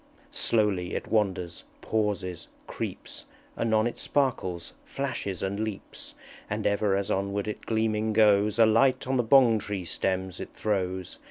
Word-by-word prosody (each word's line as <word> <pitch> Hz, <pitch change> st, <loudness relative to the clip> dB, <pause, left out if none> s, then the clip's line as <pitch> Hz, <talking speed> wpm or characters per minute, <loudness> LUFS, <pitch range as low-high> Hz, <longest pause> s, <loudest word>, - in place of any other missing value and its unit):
Slowly 105 Hz, -, +1 dB
it -, -, -3 dB
wanders, 95 Hz, -5 st, 0 dB, 0.2 s
pauses, 100 Hz, -5 st, -2 dB, 0.2 s
creeps, -, -, -6 dB, 0.3 s
Anon 110 Hz, -1 st, +2 dB
it 120 Hz, -, -3 dB
sparkles, 95 Hz, -11 st, -1 dB
flashes, 115 Hz, -9 st, -4 dB
and 100 Hz, +1 st, -2 dB
leaps; 110 Hz, -2 st, -6 dB, 0.3 s
And -, -, -3 dB
ever 100 Hz, -1 st, +2 dB
as 100 Hz, 0 st, -1 dB
onward 100 Hz, +1 st, -1 dB
it 105 Hz, -, -6 dB
gleaming 110 Hz, -1 st, +1 dB
goes 105 Hz, 0 st, +4 dB
A 115 Hz, -, +7 dB
light 130 Hz, +4 st, +3 dB
on 130 Hz, +1 st, 0 dB
the 120 Hz, -, +2 dB
Bong 120 Hz, -2 st, +5 dB
tree 100 Hz, -3 st, -4 dB
stems 95 Hz, +1 st, -2 dB
it -, -, -8 dB
throws. 95 Hz, -3 st, -2 dB
105 Hz, 145 wpm, -27 LUFS, 95-110 Hz, 0.3 s, A